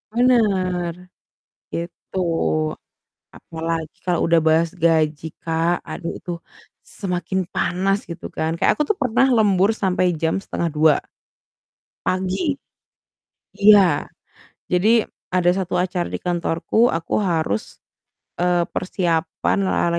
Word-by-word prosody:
Bener, 190 -8 +2 0.8
gitu. 170 +2 -6 1.2
Apalagi 165 -1 -4
kalau 175 -2 +1
udah 165 -1 +5
bahas 165 +1 +3
gaji 160 -2 +2 0.2
Kak, 165 +1 0
aduh 170 -3 -4
itu 175 - -7 0.7
semakin 180 -1 -2
panas, 195 +2 +1
gitu 170 - -7
kan, 160 0 -1
kayak - - +3
aku 300 - +2
tuh 425 - +1
pernah 255 0 +3
lembur 200 -2 +3
sampai 185 -2 +2 0.2
jam 160 0 +1
01:30. 155 -2 +2 1.1
Pagi, 190 - 0 1.1
iya. 200 -7 +6 0.6
Jadi, 215 +5 +4 0.3
ada 180 -1 +4
1 185 -1 -3
acara 180 -1 -1
di - - -5
kantorku, 175 +6 +1
aku 165 0 -1
harus, 160 - -1 0.6
eee, 175 0 +2
persiapan 170 -3 -1
la - - 0 0.2
la 170 - 0
180 Hz, 110 wpm, -21 LUFS, 165-195 Hz, 1.2 s, iya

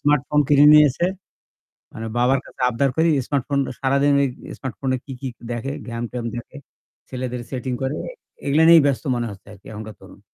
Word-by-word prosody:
Smartphone 150 0 +2
কিনে 145 0 +6
নিয়েছে। 150 +1 +5 0.9
মানে 110 0 -6
বাবার 130 +2 +3
কাছে - - -12
আবদার 130 +3 +1
করি 165 +1 +4 0.2
স্মার্টফোন 140 0 -1 0.2
সারাদিন 140 +1 +2
ওই 140 - +2 0.3
স্মার্টফোনে 130 0 -3
কি, 135 - -9
কি 135 - -5 0.2
দেখে, 120 +3 -3 0.2
game- 115 0 -4
ট্যাম 120 -2 -4
দেখে 120 +4 -8 0.5
ছেলেদের 125 -1 -4
সেটিং 130 -1 -4
করে 135 +2 -1 0.5
এগুলা 145 +3 +3
নিয়েই 165 -3 +8
ব্যস্ত 140 -3 0
মনে 120 -1 -2
হচ্ছে 100 0 -14
আরকি 100 - -18
এখনকার 110 0 -8
তরুণ। 95 +1 -15
135 Hz, 170 wpm, -22 LUFS, 120-145 Hz, 0.9 s, নিয়েই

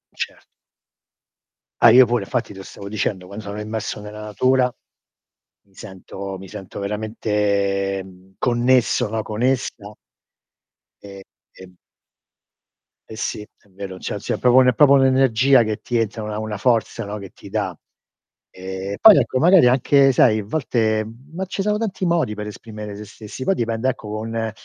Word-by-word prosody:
Cert - - -6 1.4
Ah 120 - +8
io 125 +2 +8
pure, 120 -3 -1
infatti 115 0 -3
te 95 - -11
lo 95 - -8
stavo 100 - -10
dicendo, 100 -3 -3
quando 100 +1 -8
sono 100 +1 -5
immerso 105 0 -4
nella 105 +1 -9
natura 125 +4 +1 0.9
mi 100 -1 -31
sento 95 -1 -8
mi 95 - -10
sento 95 +2 -9
veramente, 100 -2 -1
mhmm, 95 0 -18
connesso, 125 -1 +2
no? 110 +1 -2
Con 105 +1 -6
essa. 120 -5 -2 1.1
E 100 -1 -10 0.4
e 95 -1 -13 1.4
E 110 - -9
sì, - - -3
è 105 0 -18
vero, 95 -1 -9
cioè - - -4
c'è - - -3
proprio 125 0 +4
un 130 - +5
è 125 - +4
proprio 140 +3 +5
un'energia 130 -1 +4
che 110 -1 -4
ti 120 - -2
entra, 115 -1 -2
una 105 0 -4
una 110 -1 -4
forza, 115 0 0
no, 105 +1 -6
che 100 -3 -10
ti - - -14
dà. - - -3 0.7
Ehm, 95 +1 -6
poi 220 -3 +9
ecco 130 - +1
magari 175 -3 +6
anche 135 +2 +4
sai 110 -3 +4
a - - -4
volte 110 -4 0 0.3
ma 185 +3 -3
ci 190 - -4
sono 210 +1 +1
tanti 195 -4 -3
modi 170 -11 0
per 105 0 -6
esprimere 105 -1 -8
se 105 - -8
stessi, 105 +4 -9
poi 195 - +2
dipende 115 -1 -1
ecco, 115 -5 -5
con 110 +1 -3
110 Hz, 165 wpm, -21 LUFS, 100-125 Hz, 1.4 s, poi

